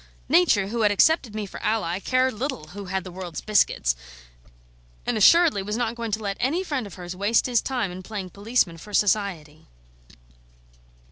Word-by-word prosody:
Nature, 190 +2 +4
who 230 +1 -2
had 210 - +4
accepted 235 - +3
me 215 -1 -3
for 195 - -10
ally, 200 -5 -1
cared 255 +4 +1
little 215 - -4
who 200 +1 -8
had 190 0 -3
the 185 - -9
world's 175 -3 -6
biscuits, 130 - +2 1.1
and 245 - 0
assuredly 310 - +5
was 210 +3 -3
not 235 -2 -1
going 235 -1 -5
to 215 +1 -2
let 200 -1 -3
any 315 +9 0
friend 280 - -3
of 195 - -11
hers 180 0 -7
waste 205 +4 +2
his 245 -3 +2
time 245 -8 -2
in 180 +1 -8
playing 190 -2 -6
policeman 200 -5 0
for 210 +4 -7
Society. 190 -8 0
205 Hz, 180 wpm, -24 LUFS, 185-235 Hz, 1.1 s, assuredly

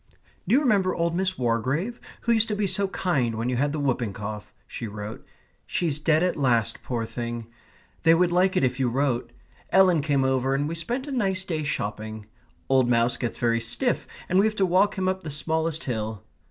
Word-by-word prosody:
"Do - - +4
you 280 - +5
remember 200 -9 +2
old 170 0 0
Miss 185 +1 0
Wargrave, 130 - -1 0.2
who 235 - 0
used 225 -1 +3
to 210 - -1
be 205 0 0
so 195 +1 0
kind 140 -12 0
when 115 +3 -2
you 125 - 0
had 145 +3 +1
the 155 - -3
whooping 125 -7 0
cough?" 105 +1 -6
she 115 - -6
wrote; 105 +1 -7 0.4
"she's 155 -5 -1
dead 155 +2 +3
at 180 - +1
last, 120 -5 +1
poor 120 -3 -3
thing. 120 0 -5 0.6
They 165 0 +6
would 175 +1 +3
like 185 +2 +3
it - - +2
if 130 0 0
you 130 -2 +2
wrote. 125 -2 0 0.4
Ellen 185 -4 +5
came 140 -2 +1
over 130 0 +1
and 145 +1 0
we 160 - -3
spent 235 +11 -3
a 290 - -6
nice 195 -7 0
day 160 -4 -2
shopping. 110 -5 -4 0.4
Old 130 -2 +3
Mouse 120 0 +3
gets 120 - -3
very 115 -1 +1
stiff, - - 0 0.2
and 185 - +3
we 205 - +5
have 215 - -2
to 195 - +2
walk 190 +3 +3
him 185 0 0
up 190 0 0
the 160 - -6
smallest 160 +2 -1
hill. 110 -4 -3
145 Hz, 210 wpm, -25 LUFS, 120-185 Hz, 0.6 s, They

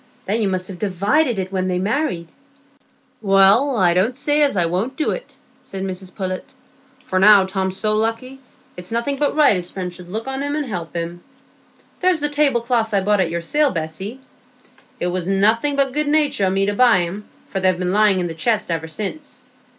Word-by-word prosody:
Then 215 +4 -1
you 210 - +1
must 185 -1 -2
have 185 -3 -8
divided 210 - +1
it 190 0 -3
when 185 -1 -1
they 180 -1 -1
were 180 - -2
married." 205 - -1 0.9
"Well, 200 +7 +4
I 180 -4 +4
don't 215 +8 +1
say 295 +2 +1
as 285 -8 +2
I 175 - +3
won't 190 +10 -2
do 310 - 0
it," - - -7 0.3
said 190 -1 -7
Mrs 185 -1 -6
Pullet, 185 -2 -4 0.6
"for 185 - 0
now 200 0 +7
Tom's 190 0 -2
so 215 -1 +1
lucky, 230 +5 -2 0.4
it's 180 0 -9
nothing 235 +5 -1
but 290 +1 0
right 295 -8 +5
his 180 -1 -4
friends 180 -2 -5
should 180 -1 -12
look 220 +6 -4
on 265 0 -3
him 285 +1 -2
and 300 -1 -2
help 175 -8 -6
him. 170 +1 -4 0.8
There's 365 -2 +2
the 295 0 -1
tablecloths 240 -6 +1
I 195 - +3
bought 205 +1 +1
at 180 -3 +1
your 170 +1 -3
sale, 295 - +1
Bessy; 185 +7 -5 0.8
it - - -2
was 180 0 -2
nothing 220 +9 +2
but 275 -2 +1
good 300 +1 -1
natur' 290 -7 +1
o' - - +2
me 195 +1 +1
to 205 - 0
buy 235 -4 +4
'em, 195 +5 -6 0.2
for 195 - -3
they've 185 -1 +2
been 180 0 -2
lying 205 -2 +4
in 180 - -1
the 165 - -4
chest 210 +3 -1
ever 160 -1 -2
since. 215 - -6
200 Hz, 210 wpm, -20 LUFS, 185-260 Hz, 0.9 s, now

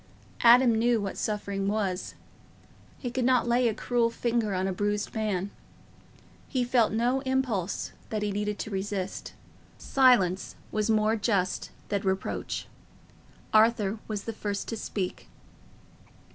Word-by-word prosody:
Adam 240 0 +7
knew 230 +1 +2
what 200 -2 -3
suffering 200 -2 -2
was—he 205 +4 -6
could 255 +1 -1
not 250 -1 +3
lay 240 +1 +3
a 225 - +1
cruel 235 0 +1
finger 230 -2 -1
on 185 +1 0
a 190 - -1
bruised 205 +2 -1
man. 205 -3 -1 1.0
He 255 -2 0
felt 245 -2 +3
no 240 +4 +1
impulse 260 -8 -1 0.2
that 215 -1 -2
he 205 - 0
needed 210 +1 -2
to 215 - -6
resist. 195 -1 -3 0.4
Silence 235 -9 +3 0.2
was 215 +1 0
more 215 0 +3
just 200 -4 0 0.2
than 200 -1 0
reproach. 190 -1 -2 0.9
Arthur 220 -1 +4
was 210 -2 -3
the 225 - -4
first 205 -1 -3
to 225 - -2
speak. 200 -3 -4
215 Hz, 130 wpm, -28 LUFS, 200-235 Hz, 1.0 s, Adam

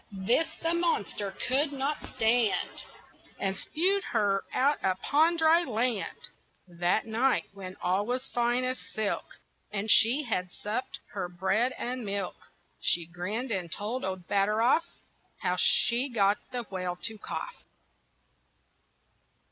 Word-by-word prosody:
This 300 +10 +3 0.2
the 330 0 +1
monster 330 - 0 0.2
could 280 +3 +2
not 280 +1 -3
stand, 230 -2 +1 0.5
And 195 -1 -1
spewed 375 - +1
her 200 -3 +1
out 285 +3 +2
upon 295 - +2
dry 325 +1 +5
land. 235 -5 -2 0.4
That 175 0 0
night, 235 +4 +2
when 190 -2 -8
all 190 +4 +1
was 250 +1 -2
fine 240 +1 +2
as 255 0 -1
silk 215 -2 -4 0.3
And 210 +1 0
she 245 +7 +6
had 185 -8 -1
supped 215 +7 -4 0.2
her 185 -3 -3
bread 195 +8 +1
and 250 0 -3
milk, 200 -2 -4 0.3
She 170 - +2
grinned 195 +9 -4
and 180 -5 -2
told 220 +7 -3
old 185 -2 -4
Batteroff 215 +8 +3 0.6
How - - +1
she 245 +4 +3
got 205 -4 +2
the 245 -1 -3
whale 185 -4 -4
to 220 -2 -3
cough. - - -6
225 Hz, 130 wpm, -29 LUFS, 195-255 Hz, 0.6 s, she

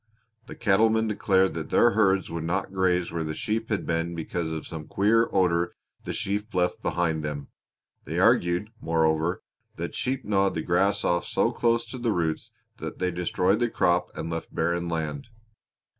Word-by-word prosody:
The - - -8
cattlemen 110 +1 +3
declared 95 -3 +2
that 80 -2 -5
their 120 - +5
herds 95 -5 +2
would 85 -1 -3
not 95 +3 -2
graze 90 -2 +1
where 85 -1 -2
the 80 -1 -4
sheep 110 +1 -2
had 105 -3 -1
been 85 +1 -1
because 85 0 -3
of 80 -1 -4
some 80 -2 -7
queer 115 +4 +3
odor 90 -2 +1 0.3
the - - -3
sheep 105 +1 -3
left 90 -1 +1
behind 85 -3 0
them; 75 -1 -5 0.6
they - - -4
argued, 85 +5 +3
moreover, 80 +1 +1 0.3
that - - -5
sheep 130 +1 -2
gnawed 100 -1 +2
the 80 - -2
grass 100 +3 +2
off 85 0 +1
so 115 - +1
close 115 -1 +1
to 130 +2 -8
the 120 -2 0
roots 80 -5 -1 0.3
that - - -6
they 90 0 0
destroyed 90 +3 +1
the 120 -1 +1
crop 90 -4 +2
and 80 - -4
left 80 0 -5
barren 85 +1 0
land. 75 -4 -3
90 Hz, 175 wpm, -26 LUFS, 85-105 Hz, 0.6 s, their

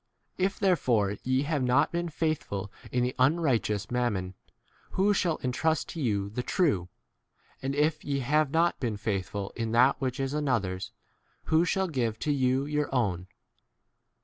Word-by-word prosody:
If 190 +2 +1
therefore 120 - +2
ye 130 +2 +1
have 150 -1 -1
not 125 0 +3
been 170 0 -2
faithful 150 - -2 0.2
in 125 -1 +1
the 125 +1 -1
unrighteous 130 - +1
mammon, 105 -7 -1 0.6
who 200 +2 +3
shall 175 -5 +1
12 - - -7
entrust 155 +6 0
to 165 - -5
you 100 -5 0
the 125 - -2
true? 125 - +1 0.7
and 135 +1 -2
if 155 +1 +1
ye 140 -1 -1
have 150 +3 +2
not 165 +3 +2
been 115 -5 -2
faithful 100 -1 -3
in 115 -1 -2
that 130 +4 +4
which 130 -1 -2
is 135 0 -1
another's, 115 -11 -1 0.5
who 160 +2 +3
shall 190 +2 +1
give 120 -9 -1
13 - - -31
to 150 - 0
you 130 0 +1
your 150 0 -1
own 95 -7 0
130 Hz, 165 wpm, -28 LUFS, 110-155 Hz, 0.7 s, that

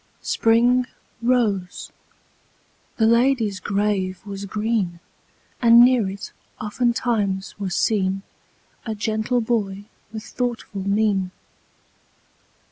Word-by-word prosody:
Spring 245 +2 +3 0.3
rose; 220 -7 0 1.1
the 225 - +3
lady's 235 -3 +2
grave 200 -2 -1
was 200 -1 -6
green; 210 -4 -1 0.6
And 235 -1 +7
near 245 -6 +3
it, 195 +1 -7 0.3
oftentimes, 215 -3 -1
was 190 -3 -2
seen 195 -3 +1 0.6
A 220 -2 -4
gentle 220 +3 0
boy 205 -4 -2 0.3
with 220 -1 -6
thoughtful 235 -6 -4
mien. 200 -2 +1
215 Hz, 90 wpm, -22 LUFS, 195-235 Hz, 1.1 s, And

